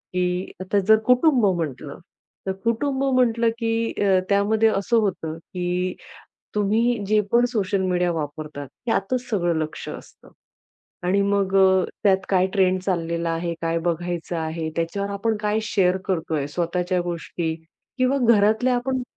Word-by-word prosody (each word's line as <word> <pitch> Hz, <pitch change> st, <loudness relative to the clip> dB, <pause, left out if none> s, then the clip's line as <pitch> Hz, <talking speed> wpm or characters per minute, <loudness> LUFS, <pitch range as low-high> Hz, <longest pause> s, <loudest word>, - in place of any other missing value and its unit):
की, 180 Hz, +1 st, -1 dB
आता 195 Hz, +2 st, +1 dB
जर 220 Hz, 0 st, +7 dB
कुटुंब 250 Hz, -2 st, +4 dB
म्हटलं, 150 Hz, -1 st, -5 dB, 0.5 s
तर -, -, +1 dB
कुटुंब 265 Hz, +4 st, 0 dB
म्हटलं, 235 Hz, -2 st, +3 dB
की 225 Hz, 0 st, 0 dB
अ, 190 Hz, -2 st, +4 dB
त्यामध्ये 215 Hz, +2 st, +3 dB
असं 210 Hz, +3 st, +1 dB
होतं, 170 Hz, -6 st, -1 dB
की 180 Hz, +1 st, -3 dB, 0.6 s
तुम्ही 225 Hz, +4 st, +2 dB
जे 215 Hz, 0 st, +3 dB
पण 240 Hz, +1 st, +5 dB
सोशल 200 Hz, -4 st, 0 dB
मीडिया 180 Hz, -1 st, +1 dB
वापरतात, 150 Hz, -2 st, -5 dB, 0.2 s
त्यातच 240 Hz, +2 st, 0 dB
सगळं 175 Hz, -6 st, +1 dB
लक्ष 155 Hz, -, -5 dB
असतं. -, -, -11 dB, 0.8 s
आणि 195 Hz, +2 st, +2 dB
मग 200 Hz, -1 st, 0 dB
अ, 190 Hz, -1 st, +5 dB, 0.2 s
त्यात 190 Hz, -1 st, +5 dB
काय 185 Hz, -1 st, +3 dB
ट्रेंड 185 Hz, -1 st, +3 dB
चाललेला 170 Hz, -2 st, -1 dB
आहे, 170 Hz, +1 st, -2 dB
काय 165 Hz, 0 st, 0 dB
बघायचं 175 Hz, 0 st, -2 dB
आहे, 160 Hz, 0 st, -3 dB
त्याच्यावर 200 Hz, +5 st, -2 dB
आपण 215 Hz, +2 st, -1 dB
काय 210 Hz, 0 st, 0 dB
शेअर 190 Hz, -3 st, +2 dB
करतोय, 160 Hz, -5 st, -1 dB
स्वतःच्या 175 Hz, +3 st, -1 dB
गोष्टी 170 Hz, -1 st, -3 dB, 0.4 s
किंवा 255 Hz, +2 st, +2 dB, 0.2 s
घरातल्या 220 Hz, +5 st, +3 dB
आपण 260 Hz, +1 st, -1 dB
190 Hz, 140 wpm, -23 LUFS, 170-220 Hz, 0.8 s, जर